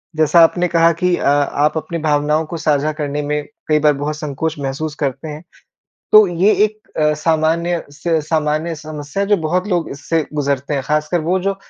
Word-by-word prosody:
जैसा 155 +2 +4
आपने 175 +2 +2
कहा 165 -1 +4
कि 180 -1 +3
अ, - - -5
आप 145 +2 +2
अपनी 160 +2 -4
भावनाओं 150 +1 +1
को 165 +2 -6
साझा 155 -1 +1
करने 145 0 -2
में 150 0 -2 0.2
कई 155 -1 +3
बार 150 0 +4
बहुत 145 +2 -3
संकोच 150 +1 -3
महसूस 145 +3 -4
करते 145 +1 -3
हैं 150 +1 -8 0.7
तो 215 -1 +8
ये 180 +4 +2
एक 215 0 -3 0.2
अ, 150 0 +3
सामान्य 165 +2 0
से 160 +2 -1
सामान्य 155 +1 -1
समस्या 150 +3 -5
है 200 - -2
जो 205 - +4
बहुत 175 +3 -1
लोग 175 -4 -1
इससे 150 +3 -2
गुज़रते 140 -1 -1
हैं 135 - -1
ख़ासकर 150 +4 0
वो 175 +4 0
जो 195 +1 -1
155 Hz, 190 wpm, -18 LUFS, 150-170 Hz, 0.7 s, तो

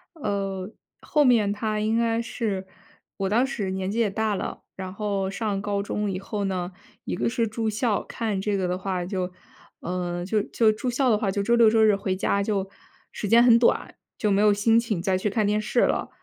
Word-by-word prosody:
呃， 195 - -3 0.3
后 300 -2 +2
面 225 -5 +4
它 215 +1 -2
应 215 +2 +1
该 230 0 +1
是， 215 -5 -3 0.5
我 195 -1 -1
当 235 +5 +3
时 215 -8 -3
年 190 0 -2
纪 230 - -2
也 225 - +3
大 215 +2 -1
了。 - - -5 0.2
然 185 -1 -6
后 200 -2 -2
上 205 -2 -2
高 200 -1 -1
中 205 0 -2
以 185 - -3
后 205 +1 -4
呢， 185 -1 -2 0.3
一 - - -2
个 180 - 0
是 230 -1 0
住 220 +1 -2
校， 215 0 0
看 220 -4 -3
这 205 0 0
个 185 -2 -1
的 180 - -1
话 185 -2 -3
就 185 -1 -3 0.5
呃， 175 0 -3
就 210 +3 +1
就 225 -2 +2
住 215 +4 -3
校 255 +2 +1
的 215 - +4
话， 210 - -1
就 200 - -1
周 235 +4 +3
六 230 -2 +6
周 220 0 +3
日 215 -2 +5
回 195 -1 -2
家 200 +1 0
就 195 -2 -1 0.4
时 210 - -4
间 230 +2 +7
很 235 -2 +7
短， 235 - +1 0.2
就 210 - 0
没 195 - +3
有 210 -1 +5
心 225 +3 +3
情 225 -7 -2
再 185 0 +1
去 210 - -1
看 215 +1 0
电 210 +1 +1
视 225 +3 +1
了。 - - +1
210 Hz, 235 characters per minute, -25 LUFS, 195-225 Hz, 0.5 s, 间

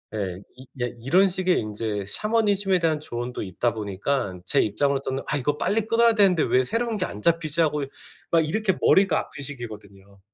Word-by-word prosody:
예. 95 -3 -4
이 130 +1 -13 0.2
예 120 - -2
이런 180 +11 +4
식의 185 -1 +1
인제 105 -1 -3
샤머니즘에 205 - +1
대한 160 -3 +1
조언도 120 -3 -5
있다 105 +5 -1
보니깐 100 -1 -3
제 - - +2
입장으로서는 135 +4 0
'아 145 - 0
이거 145 +2 -1
빨리 220 +2 +1
끊어야 230 0 +4
되는데 195 -7 +4
왜 130 - +3
새로운 230 - -1
게 185 - -1
안 105 - -8
잡히지.' 165 -1 +1
하고 150 -2 +1
이 - - -5 0.4
막 165 - +5
이렇게 210 +2 +1
머리가 190 -5 +4
아픈 140 - -7
시기거든요. 100 -7 -8
145 Hz, 395 characters per minute, -24 LUFS, -, 0.4 s, 막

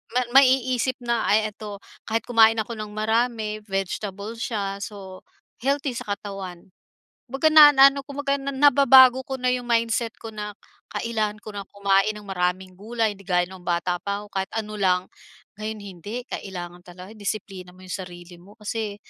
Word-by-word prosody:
ma 250 - +4 0.2
maiisip 255 -1 +2
na, 235 -1 0
"Ay 215 +1 +3
ito, 205 -1 -9 0.3
kahit 225 +1 0
kumain 225 -2 +6
ako 225 +1 -4
ng 215 - -4
marami, 220 -1 0
vegetable 200 +2 -4
siya, 200 -4 -3
so 190 -3 -9 0.4
healthy 275 +1 0
sa 205 - -3
katawan." 195 -4 -8 0.6
'Baga 270 +4 +3
na 300 -1 +10
naano 275 +1 +7
ko, - - -8
kumbaga 280 0 0
na 275 +1 -4
nababago 265 -2 +7
ko 265 - -3
na 250 0 +1
'yong 250 -1 -2
mindset 230 0 +1
ko 225 - -7
na, 210 -1 -6 0.4
"Kailangan 215 -2 -2
ko 215 - -8
na 200 - -4
kumain 200 +1 +1
ng 210 - -10
maraming 185 0 -1
gulay." 220 +1 -1
'di 195 - -14
gaya 180 -2 +3
nung 185 -2 -12
bata 175 +1 0
pa 200 +2 -3
ako 210 - -14
kahit 190 0 -1
ano 215 -1 -4
lang. 180 -1 +2 0.5
Ngayon 215 0 -4 0.2
hindi 230 +8 -6
kailangan 175 -2 -6
talaga 180 +3 -11
i-disiplina 195 -3 -6
mo 185 - -17
'yong 185 - -7
sarili 175 -1 -12
mo 195 +4 -17
kasi, 210 -1 -4
215 Hz, 175 wpm, -24 LUFS, 195-235 Hz, 0.6 s, na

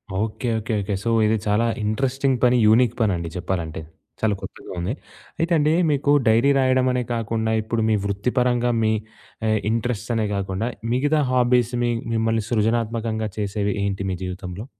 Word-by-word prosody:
Okay. 110 +4 -2
Okay. 110 +1 -4
Okay. 100 +1 -3
So 115 - 0 0.2
ఇది 110 +1 +2
చాలా 105 +3 +2 0.2
interesting 135 +5 0
పని. 125 0 +5
యూనిక్ 115 +2 +4
పనండి 90 -6 0
చెప్పాలంటే. 85 -4 -3 0.4
చాలా 110 -2 +2
కొత్తగా - - -9
ఉంది. 90 +6 -2 0.5
అయితే 165 +2 0
అండి 150 +1 +3 0.2
మీకు 145 -1 +1 0.2
డైరీ 115 +5 +4
రాయడం 130 -1 +3
అనే 125 0 0
కాకుండా. 110 -1 -1
ఇప్పుడు 110 +1 -2
మీ 110 - +3
వృత్తి 100 +4 -1
పరంగా 125 -1 +2
మీ 110 - +3 0.6
ఆహ్, 110 0 +2
ఇంట్రెస్ట్‌స్ 115 0 -2
అనే 110 -1 +1
కాకుండా. 100 +3 -2 0.2
మిగతా 145 +4 +2
హాబీస్ 125 -1 +2
మీ 120 - +1 0.2
మిమ్మల్ని 115 0 +1
సృజనాత్మకంగా 110 -1 0
చేసేవి 100 -1 -1
ఏంటి 100 -1 -2
మీ - - -1
జీవితంలో? 90 +2 -6
110 Hz, 160 wpm, -22 LUFS, 105-125 Hz, 0.6 s, పని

